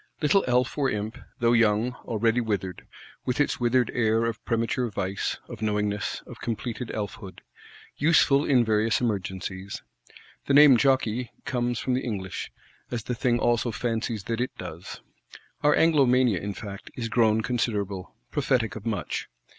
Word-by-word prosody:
_ - - -31
Little 190 +7 +4
elf, 125 +3 +1
or 135 -2 +2
imp; 105 +1 -3 0.2
though 120 0 +4
young, 115 +1 +3
already 115 +2 +1
withered; 100 -5 -3 0.4
with 125 +2 -2
its 145 - +1
withered 120 0 +2
air 115 -1 +2
of 115 -2 -3
premature 115 +1 0
vice, 100 -1 -2
of - - -9
knowingness, 105 -1 -1
of - - -12
completed 120 +1 -4
elf 105 -3 -4
hood: 95 -3 -10 0.6
useful 145 -2 +4
in 125 -5 +3
various 110 +1 +2
emergencies. 95 -3 -3 0.6
The 140 - +3
name 145 -2 +9
jokei - - +4
(jockey) 125 -3 +1
comes 120 -1 -1
from 130 - -1
the 130 - 0
English; 95 -6 -4 0.4
as 120 -3 -3
the 125 - -3
thing 120 0 +1
also 120 0 +1
fancies 115 -2 -2
that 115 +3 -2
it 130 +1 -3
does. 85 -1 -8 0.6
Our 150 0 +4
Anglomania, 130 - +4
in 100 +1 -5
fact, 100 -2 -8
is 120 -2 -3
grown 115 -1 +3
considerable; 105 -6 -2 0.2
prophetic 115 -4 0
of 110 0 -7
much. 110 -3 -2
115 Hz, 160 wpm, -26 LUFS, 105-125 Hz, 0.6 s, name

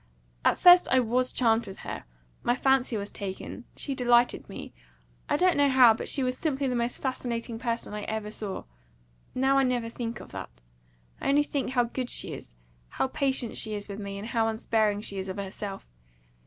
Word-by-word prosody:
At - - +3
first 355 0 +8
I 260 - +5
WAS 250 +1 +1
charmed 230 -2 +2
with 195 - -9
her - - -6 0.4
my 240 - +2
fancy 265 -3 +2
was 200 0 -5
taken; 200 +5 -6
she 280 - -3
delighted 245 -1 +2
me - - -8 0.6
I - - +2
don't 365 +2 +4
know 285 -1 +4
how; 255 -3 +7
but 220 - -4
she 275 - +1
was 255 0 0
simply 280 -3 0
the 255 - 0
most 240 0 -1
fascinating 235 -3 -3
person 235 -3 -3
I 210 - -4
ever 220 -1 -3
saw. 210 -3 -4 0.7
Now 270 +1 +3
I - - +4
never 245 -3 0
think 230 -1 -5
of - - -12
that. - - -8 0.6
I - - 0
only 290 +1 +4
think 285 -2 -2
how 245 -2 +4
good 245 +1 -4
she - - -1
is - - -10 0.3
how 265 - -1
patient 265 -4 0
she 215 -1 -1
is 205 -1 -4
with 200 0 -6
me, 200 -1 -5
and 210 +3 -6
how 225 -2 +1
unsparing 220 -2 +1
she 200 -2 -3
is 190 0 -4
of 190 - -5
herself. 195 - -6
235 Hz, 200 wpm, -28 LUFS, 210-260 Hz, 0.7 s, first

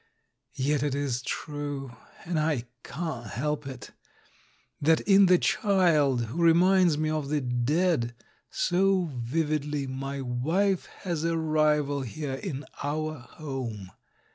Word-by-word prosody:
Yet 140 +1 +1
it 145 -2 0
is 135 -4 -1
true 145 -2 -5 0.2
— - - -19
and 165 -2 -1
I 150 -6 +1 0.2
can't 140 -6 -5
help 150 +6 -2
it 130 -5 -8 0.4
— - - -35
that 160 +2 +4
in 195 -1 +6
the 180 0 +6
child 160 - +2
who 120 +10 -6
reminds 175 0 +5
me 155 0 0
of 155 -3 -2
the 150 0 +1
dead 125 +1 +1 0.3
so 185 -2 +1
vividly 145 +3 -1
my 135 +1 -4
wife 160 +10 0 0.2
has 170 -5 -2
a 165 0 +1
rival 150 -3 +2
here 135 +3 -4
in 140 0 -5 0.2
our 155 +1 -2
home. 120 - -6
150 Hz, 135 wpm, -27 LUFS, 135-165 Hz, 0.4 s, in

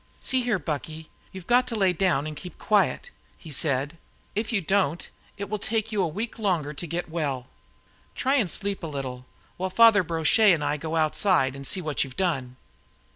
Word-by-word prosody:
"See 260 -1 +1
here, 240 -4 +1
Bucky, 155 0 -5 0.2
you've 190 -2 -9
got 245 +3 +3
to 235 - -3
lie 195 -4 +3
down 175 -5 +1
and 155 0 -5
keep 180 +2 -10
quiet," 215 - +1 0.3
he 160 - -11
said. 145 +2 -1 0.3
"If 215 +3 -2
you 220 - +2
don't, 185 -3 0 0.3
it 200 - -4
will 215 0 -3
take 225 +1 -1
you 210 -2 +1
a - - +2
week 220 +9 -5
longer 170 -8 0
to 170 +4 -6
get 170 +3 -3
well. 145 -6 -2 0.7
Try 270 +2 +2
and 215 -9 +1
sleep 200 +4 -2
a 165 - -4
little, 130 -4 -6 0.3
while 185 +1 -2
Father 225 +1 +6
Brochet 170 +5 +4
and 155 -3 -1
I 145 +1 0
go 160 +2 -4
outside 155 -3 +2
and 140 0 -5
see 190 - 0
what 150 -4 0
you've 130 -2 -10
done." 135 -9 -1
170 Hz, 195 wpm, -26 LUFS, 150-205 Hz, 0.7 s, Father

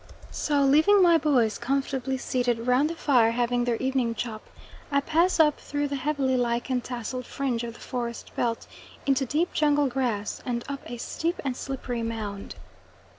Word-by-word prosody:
So 290 -2 +1
leaving 315 +9 +5
my 340 -2 +6
boys 255 -8 +2
comfortably 265 +1 -1
seated 245 -2 -1
round 255 +4 +3
the 335 - -4
fire 250 -8 +3
having 240 +1 0
their 240 -1 +1
evening 260 -2 0
chop, 220 -3 -4 0.5
I 280 - +4
pass 330 +6 +2
up 300 -2 +4
through 290 0 -2
the 280 - -2
heavily 270 -1 0
lichen 245 +1 0
tasselled 250 +1 -5
fringe 250 -4 -2
of 235 -1 -6
the - - -14
forest 235 -2 -5
belt 230 -1 -1 0.4
into 270 -1 +2
deep 325 +7 0
jungle 295 -1 +3
grass, 245 -6 -2
and 235 -1 -2
up 280 -1 -5
a 240 - -5
steep 335 +8 -3
and 260 -2 -1
slippery 250 -3 -4
mound. 215 -3 -5
260 Hz, 170 wpm, -26 LUFS, 235-285 Hz, 0.5 s, my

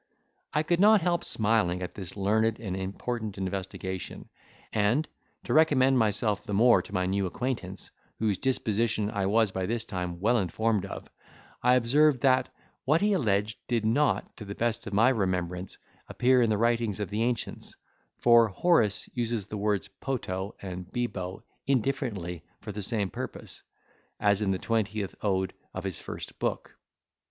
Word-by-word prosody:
I 150 - +1
could 170 +2 +1
not 210 +1 +6
help 175 0 +1
smiling 105 -5 +1
at 90 - -5
this 95 -1 -8
learned 110 +3 +1
and 100 -5 -4
important 100 +3 -4
investigation; 95 -1 -5 0.4
and, 110 +9 +2 0.4
to - - -2
recommend 135 -4 +5
myself 105 -1 +1
the 105 - -4
more 120 +3 +6
to - - -14
my 90 -2 0
new 95 +1 0
acquaintance, 125 +6 -4 0.3
whose 105 -4 0
disposition 110 -4 0
I 100 -3 -1
was 110 0 +3
by 95 -1 -2
this 115 0 -2
time 90 -3 -4
well 115 +5 +3
informed 100 +2 0
of, - - -8 0.5
I 125 +1 +5
observed 130 +3 +4
that, 130 -1 +3 0.3
what 155 +5 +3
he 205 0 +3
alleged, 105 - 0
did 115 -3 0
not, 140 +6 +1
to - - -7
the 100 0 -6
best 115 -2 -1
of 100 - -5
my 115 +5 +5
remembrance, 90 -5 -1 0.3
appear 125 0 +3
in 115 - +3
the 105 - +2
writings 115 -2 +1
of 105 - -3
the 105 +2 -1
ancients; 120 -2 -2 0.4
for 120 -1 +6
Horace 110 - +2
uses 115 -4 -1
the 105 - -6
words 105 -1 0
poto 100 -7 -4
and 90 -1 -6
bibo 95 -7 -3 0.2
indifferently 110 - -1 0.2
for 105 - -7
the 105 +1 -5
same 100 -1 -1
purpose, - - -7 0.6
as 100 -1 +3
in 105 - +1
the 95 - +1
twentieth 110 -2 -1
Ode 95 -2 0 0.2
of 95 - -4
his 95 -3 -4
first - - -8
Book. - - -3
110 Hz, 165 wpm, -28 LUFS, 95-120 Hz, 0.6 s, not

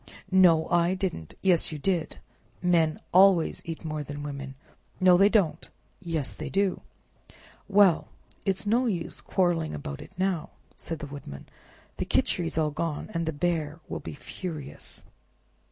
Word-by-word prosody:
"No, 175 -4 +6
I 175 +1 +3
didn't!" 180 - -4
"Yes, 175 -3 +3
you 155 - -4
did! 170 +1 -1 0.4
Men 165 -3 +2
always 185 -2 +5
eat 165 0 -6
more 155 -1 -3
than 145 0 -6
women. 140 -2 -6 0.4
"No, 185 -1 +6
they 195 +3 +6
don't!" 200 -7 +1 0.3
"Yes, 165 -6 -2
they 155 -2 -6
do!" 195 +3 +1 0.9
"Well, 195 -4 +5 0.4
it's 195 0 -1
no 240 +5 +2
use 175 -7 -2
quarreling 175 - 0
about 70 -1 -6
it - - -11
now," 185 -3 0 0.3
said 165 - -5
the 150 - -6
Woodman, 140 - -9 0.5
"the - - -2
Khichri's 165 -2 0 0.2
gone, 165 +5 -3
and 165 -1 -1
the - - +1
Bear 160 0 -1
will - - -4
be - - -7
furious." 155 -1 -7
165 Hz, 145 wpm, -27 LUFS, 150-185 Hz, 0.9 s, No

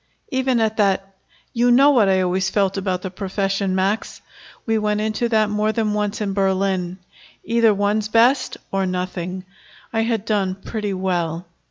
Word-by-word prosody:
"Even 260 -3 +1
at 220 -1 0
that 195 -2 +1 0.2
" - - -34
"You 240 +1 +2
know 275 +4 +6
what 225 -8 +4
I 190 -1 +3
always 185 +1 0
felt 195 -1 +1
about 185 -2 -2
the 190 - -4
profession, 195 0 -2
Max. 195 +3 -1 0.5
We 225 -1 +1
went 210 0 0
into 220 +2 -1
that 215 -2 +2
more 210 +1 +1
than 220 -2 -1
once 210 0 -2
in 200 -2 -1
Berlin. 190 -2 0 0.5
Either 230 -1 +3
one's 205 +1 0
best 240 +5 +3
or 195 -1 0
nothing. 185 0 -4 0.5
I 225 - +1
had 225 -2 -1
done 200 -3 0
pretty 205 0 -4
well. 175 -2 -2
200 Hz, 170 wpm, -21 LUFS, 190-220 Hz, 0.5 s, know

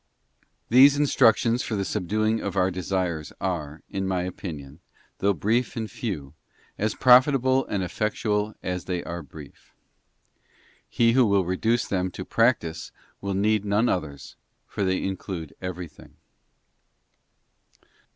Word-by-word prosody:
These 135 +4 +7
instructions 120 -4 +3
for 110 - -3
the 100 -1 -1
subduing 110 +3 0
of 100 -1 -4
our 95 0 +2
desires 90 -3 -2
are, 80 -5 -4
in 95 0 -3
my 95 -1 0
opinion, 80 -6 -7 0.4
though 100 - +3
brief 115 +8 0
and 110 -2 -4
few, 75 - -5 0.4
as 110 +1 -1
profitable 130 +1 +5
and 100 -2 -2
effectual 105 +2 -1
as 90 -1 -3
they 90 -2 -3
are 85 0 -5
brief. 75 0 -14 1.1
He 115 -1 +3
who 125 -1 +4
will 100 -2 +2
reduce 110 +6 0
them 95 -1 -1
to 95 - -6
practice 115 -9 0 0.3
will 100 -1 -2
need 105 +1 +2
none 105 +3 +1
others, 75 - -3 0.3
for 100 - -4
they 95 -1 0
include 95 -4 -5
everything. 90 -3 -8
95 Hz, 130 wpm, -25 LUFS, 90-110 Hz, 1.1 s, These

